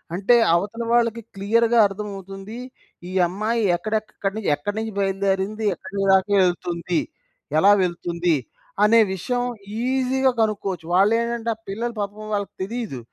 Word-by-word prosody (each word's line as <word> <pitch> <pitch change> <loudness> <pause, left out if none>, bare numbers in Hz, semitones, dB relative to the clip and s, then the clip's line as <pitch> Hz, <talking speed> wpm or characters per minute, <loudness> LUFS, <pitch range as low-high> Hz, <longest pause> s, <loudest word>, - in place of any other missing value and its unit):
అంటే, 200 +6 +4 0.2
అవతల 205 +6 -2
వాళ్ళకి 230 -1 +2
క్లియర్‌గా 230 +4 +2
అర్థం 205 +1 -6
అవుతుంది, 195 +3 -9 0.5
ఈ - - -7
అమ్మాయి 215 +5 -1 0.2
ఎక్కడెక్కడ్ 215 +3 -3
ఎక్కనుంచి 200 -2 0
ఎక్కడినుంచి 215 +7 -4
బయలుదేరింది, 195 +2 0
ఎక్కడిదాకేళ్తుంది, 190 -3 +1 0.6
ఎలా 195 +6 +6
వెళ్తుంది 175 -1 -1 0.5
అనే 220 +2 +6 0.2
విషయం 245 +7 -2 0.4
ఈజిగా 260 0 +2
కనుక్కోవచ్చు. 195 -6 -1
వాళ్ళేంటంటే, 230 +4 +2
ఆ - - -30
పిల్లలు 235 +4 -3
పాపం 210 +1 -5
వాళ్ళకి 200 -1 -2
తెలీదు. 220 - -4
205 Hz, 115 wpm, -23 LUFS, 190-230 Hz, 0.6 s, ఎలా